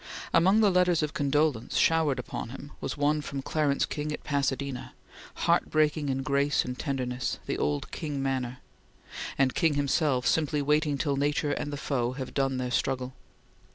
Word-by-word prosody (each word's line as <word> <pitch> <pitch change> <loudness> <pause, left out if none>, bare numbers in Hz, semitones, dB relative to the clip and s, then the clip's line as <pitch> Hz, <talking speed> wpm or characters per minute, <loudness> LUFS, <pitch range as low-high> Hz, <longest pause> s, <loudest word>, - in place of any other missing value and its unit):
Among 190 +6 +5
the 205 -2 +5
letters 180 -3 +3
of 150 - -2
condolence 145 -4 +1
showered 160 -5 +3
upon 125 -2 -5
him 140 +3 -9
was - - -3
one 150 +1 +2
from 140 -2 -5
Clarence 145 -2 +1
King 150 0 -4
at 150 - -5
Pasadena, 140 -2 -2 0.5
"heart - - +3
breaking 155 -1 +2
in 135 0 -1
grace 140 +1 +2
and 125 - -4
tenderness 125 -4 -2
the - - -2
old 75 -1 -1
King 150 -3 -4
manner"; 130 -2 -2 0.8
and 135 -2 +3
King 160 -3 +2
himself 140 -2 +1
"simply 150 -2 +2
waiting 150 0 +2
till 140 -1 0
nature 145 +1 +1
and 145 - -2
the 145 - -4
foe 125 -4 -1
have 130 -1 -6
done 135 -1 0
their 125 -1 -2
struggle." 130 0 -1
140 Hz, 170 wpm, -28 LUFS, 130-150 Hz, 0.8 s, Among